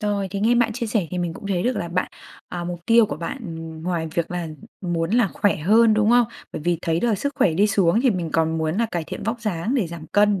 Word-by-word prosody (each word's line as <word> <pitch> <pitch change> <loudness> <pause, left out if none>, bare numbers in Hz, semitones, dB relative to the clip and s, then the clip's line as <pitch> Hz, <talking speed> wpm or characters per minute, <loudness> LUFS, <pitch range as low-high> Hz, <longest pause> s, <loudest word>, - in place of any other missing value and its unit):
Rồi, 205 -2 -1
thì 200 0 -3
nghe 230 +3 +3
bạn 235 -1 +2
chia 235 0 -3
sẻ 210 -6 0
thì 180 - -3
mình 170 -2 -2
cũng 200 - -9
thấy 185 -3 0
được 250 0 0
là 170 - -3
bạn, 180 +2 -1 0.4
à, 175 -1 -5
mục 175 -1 -5
tiêu 230 -1 +6
của - - -4
bạn, 170 - -4
ừm, 160 -1 -7
ngoài 170 -2 -2
việc 170 0 -1
là 175 -2 -3 0.3
muốn 170 -2 -1
là 230 -3 +3
khỏe 205 - +1
hơn, 215 +7 +4
đúng 215 0 +3
không? 240 -1 +5 0.3
Bởi 150 - -5
vì 175 -1 +1
thấy 165 0 0
được 235 -3 +2
sức 280 +8 -2
khỏe 165 - +2
đi 200 +5 +4
xuống 195 0 +3
thì 260 0 +3
mình 175 -6 -2
còn 160 0 +1
muốn 160 +3 -1
là 230 0 +2
cải 170 -2 -2
thiện - - -7
vóc 230 +2 -2
dáng 210 +3 -2
để 225 -10 +1
giảm 165 -1 -8
cân, 205 0 +3
185 Hz, 275 wpm, -23 LUFS, 170-220 Hz, 0.4 s, tiêu